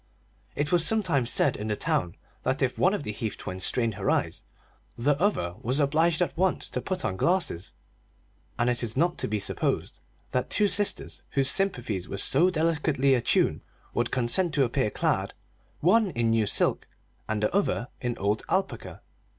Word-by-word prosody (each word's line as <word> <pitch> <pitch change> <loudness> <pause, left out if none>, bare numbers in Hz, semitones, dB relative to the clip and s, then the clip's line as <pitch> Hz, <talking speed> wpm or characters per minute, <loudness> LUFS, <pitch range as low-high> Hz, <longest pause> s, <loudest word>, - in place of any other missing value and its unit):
It 145 +1 -1
was 175 -2 +3
sometimes 165 - +1
said - - +2
in 105 - -5
the 105 - 0
town 90 -3 -1 0.3
that 130 +2 0
if 130 - -1
one 185 +3 +3
of 175 - -5
the 105 - -4
Heath 105 0 -4
twins 95 0 -6
strained 115 +1 +2
her 100 0 -2
eyes, - - -1 0.5
the 140 +5 +2
other 185 - +1
one 90 - -18
was 130 +5 -1
obliged 160 +4 +2
at - - -4
once 185 +2 0
to - - -3
put 185 -1 -3
on 95 - -2
glasses; 170 - 0 0.9
and 120 - +1
it 120 -1 +1
is 115 0 -3
not 175 +4 +1
to - - -1
be 105 0 -1
supposed - - -2 0.3
that 125 - -1
two 210 - +2
sisters 205 0 +1 0.2
whose 135 0 +5
sympathies 120 - -1
were 100 - -4
so 150 - +4
delicately 155 -5 +1
attuned 120 -3 +1 0.3
would - - 0
consent 135 +8 +1
to 140 - +4
appear 130 -1 0
clad - - -1 0.5
one 205 +5 +4
in 115 -6 0
new 110 -2 +2
silk - - +1 0.4
and 105 -1 -1
the 105 - 0
other 200 -10 0
in 120 -2 -2
old 105 +3 0
alpaca. 190 +1 -2
135 Hz, 185 wpm, -27 LUFS, 110-175 Hz, 0.9 s, whose